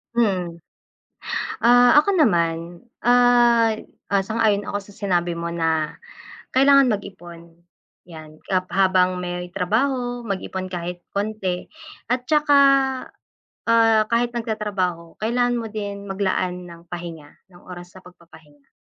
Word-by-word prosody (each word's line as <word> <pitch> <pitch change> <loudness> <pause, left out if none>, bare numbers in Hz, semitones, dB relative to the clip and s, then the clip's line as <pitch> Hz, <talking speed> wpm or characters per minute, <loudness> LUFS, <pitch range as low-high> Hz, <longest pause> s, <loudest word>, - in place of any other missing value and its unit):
Mm. 185 -7 0 1.0
Ah, 245 +4 +6
ako 390 +4 0
naman, 170 - +1 0.2
ah, 240 -1 +5 0.4
ah, 200 -1 +2
sang-ayon 215 -2 +1
ako 205 - -3
sa 200 0 -17
sinabi 175 -4 -1
mo 170 0 -4
na, 160 -2 -1 0.6
kailangan 275 0 +5
mag-ipon, 175 -5 -7 0.5
'yan. 155 -2 -13
Hab 185 -1 +1
habang 185 -1 +2
may 180 0 -4
trabaho, 245 +5 -1
mag-ipon 190 -2 -4
kahit 175 -1 -6
konti 200 -3 -3 0.4
at 250 0 -1
tsaka, 300 -1 +3 1.1
ah, 225 -1 +4
kahit 235 +1 +2
nagtatrabaho, 205 -8 -3
kailangan 245 +2 0
mo 225 -2 -6
din 200 -1 -5
maglaan 185 -2 -2
ng 170 0 -14
pahinga, 170 -4 -8 0.2
ng 175 -1 -19
oras 175 0 -11
sa - - -11
pagpapahinga. 160 -5 -19
195 Hz, 120 wpm, -22 LUFS, 175-230 Hz, 1.1 s, Ah